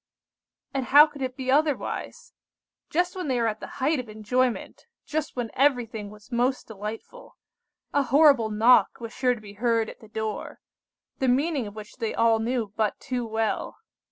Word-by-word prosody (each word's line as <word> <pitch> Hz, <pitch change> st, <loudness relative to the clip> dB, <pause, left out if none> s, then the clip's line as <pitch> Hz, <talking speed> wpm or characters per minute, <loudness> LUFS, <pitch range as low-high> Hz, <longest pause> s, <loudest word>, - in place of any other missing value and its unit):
"And 270 Hz, -2 st, -1 dB
how 290 Hz, +4 st, +9 dB
could 290 Hz, -3 st, -11 dB
it 260 Hz, 0 st, -3 dB
be 260 Hz, -1 st, -1 dB
otherwise? 295 Hz, 0 st, -1 dB, 0.6 s
Just 355 Hz, +3 st, 0 dB
when 365 Hz, -4 st, -4 dB
they 255 Hz, -3 st, +1 dB
were 230 Hz, -, +1 dB
at 215 Hz, -1 st, -2 dB
the -, -, -7 dB
height 280 Hz, +2 st, +1 dB
of 245 Hz, -3 st, -6 dB
enjoyment, 240 Hz, -, -1 dB, 0.2 s
just 310 Hz, 0 st, -3 dB
when 240 Hz, -3 st, -3 dB
everything 245 Hz, -6 st, +1 dB
was 210 Hz, +3 st, -16 dB
most 250 Hz, +2 st, 0 dB
delightful, 220 Hz, -, -8 dB, 0.6 s
a 285 Hz, -, +3 dB
horrible 275 Hz, -3 st, +5 dB
knock 225 Hz, +4 st, +4 dB
was 230 Hz, -1 st, -7 dB
sure 250 Hz, -1 st, +1 dB
to 225 Hz, -, -12 dB
be 205 Hz, -1 st, -11 dB
heard 230 Hz, -2 st, +1 dB
at -, -, -16 dB
the 220 Hz, -, -15 dB
door, 215 Hz, 0 st, -5 dB, 0.6 s
the 265 Hz, -, +1 dB
meaning 275 Hz, -1 st, +1 dB
of 205 Hz, -, -10 dB
which 215 Hz, +2 st, -10 dB
they 225 Hz, -3 st, -3 dB
all 230 Hz, -1 st, +3 dB
knew 225 Hz, -2 st, -2 dB
but 215 Hz, -2 st, 0 dB
too 250 Hz, -3 st, -3 dB
well. 220 Hz, 0 st, -2 dB
245 Hz, 180 wpm, -26 LUFS, 220-270 Hz, 0.6 s, how